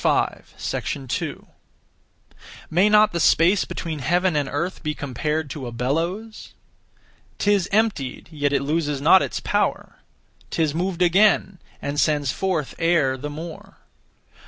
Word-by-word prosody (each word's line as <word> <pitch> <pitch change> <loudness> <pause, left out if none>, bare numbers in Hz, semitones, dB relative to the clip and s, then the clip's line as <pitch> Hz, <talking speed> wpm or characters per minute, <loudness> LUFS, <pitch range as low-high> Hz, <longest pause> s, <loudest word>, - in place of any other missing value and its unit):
May 185 +6 +4
not 210 0 +5
the 170 - -2
space 170 +4 +4
between 160 -3 -5
heaven 175 +5 +1
and 145 -2 0
earth 180 +2 -3
be 150 -2 -3
compared 145 +3 -3
to 135 -4 -6
a - - -6
bellows? 165 - -3 0.8
'Tis 200 -3 +1
emptied, 200 - 0
yet 145 -2 -1
it 140 - +1
loses 150 -1 -1
not 165 +6 +6
its - - -2
power; - - -1 0.5
'Tis 160 -3 0
moved 180 +1 -1
again, 190 +1 +3 0.2
and 145 +1 -2
sends 145 -4 +2
forth 180 -5 -2
air 165 -6 +2
the 145 +3 -6
more. 160 +2 -9
165 Hz, 125 wpm, -23 LUFS, 145-185 Hz, 0.8 s, not